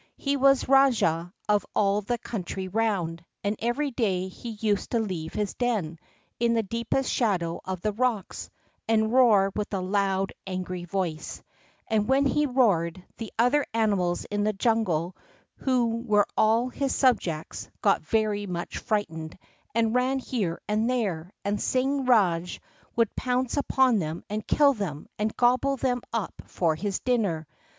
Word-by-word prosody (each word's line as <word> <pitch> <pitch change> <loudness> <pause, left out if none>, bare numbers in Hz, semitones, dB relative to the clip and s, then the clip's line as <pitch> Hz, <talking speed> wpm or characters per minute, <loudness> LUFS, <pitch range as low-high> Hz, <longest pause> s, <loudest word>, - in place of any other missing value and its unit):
He 280 0 0
was 275 -1 +4
rajah 235 -11 +3 0.2
of 210 -1 +3
all 205 0 +2
the 240 +4 -2
country 190 -4 -5
round, 185 -5 -1 0.2
and 205 +1 0
every 260 +5 -1
day 190 -7 0
he 235 +5 -9
used 210 -2 -1
to 235 - +1
leave 180 -7 -4
his 210 -1 -1
den, 205 -10 -1 0.4
in 235 0 +2
the 225 - +2
deepest 235 +5 -1
shadow 180 -8 0
of 185 -2 -4
the 215 - 0
rocks, 230 -3 -2 0.4
and 220 0 +2
roar 215 -7 +5
with 210 -1 -3
a - - -1
loud, 195 0 0
angry 185 -1 -4
voice; 175 -3 -3 0.4
and 215 -2 +1
when 270 +1 +4
he 295 +2 +2
roared, 185 -9 +1
the 225 - -6
other 250 +6 +3
animals 200 -6 +1
in 205 0 0
the 215 +1 +1
jungle, 195 -6 0 0.4
who 240 -3 +1
were 210 -4 +3
all 225 +3 +3
his 275 +1 -2
subjects, 190 - 0
got - - +3
very 205 +3 0
much 175 -1 -4
frightened 165 -8 -3 0.4
and 225 -1 +2
ran 255 +2 +2
here 215 -10 -2
and 215 +3 +1
there; 190 -9 -1
and 205 +1 -1
Singh 265 +1 0
Rajah 180 -8 +2 0.4
would 230 -2 +1
pounce 250 0 -1
upon 265 -5 +3
them 160 -1 -4
and 215 0 -3
kill 285 -2 +5
them, 180 - -5
and 215 +1 -1
gobble 255 +3 +3
them 245 -1 0
up 230 -4 -3
for 165 -3 +1
his 195 +3 -2
dinner. 205 -11 0
215 Hz, 155 wpm, -26 LUFS, 185-245 Hz, 0.4 s, roar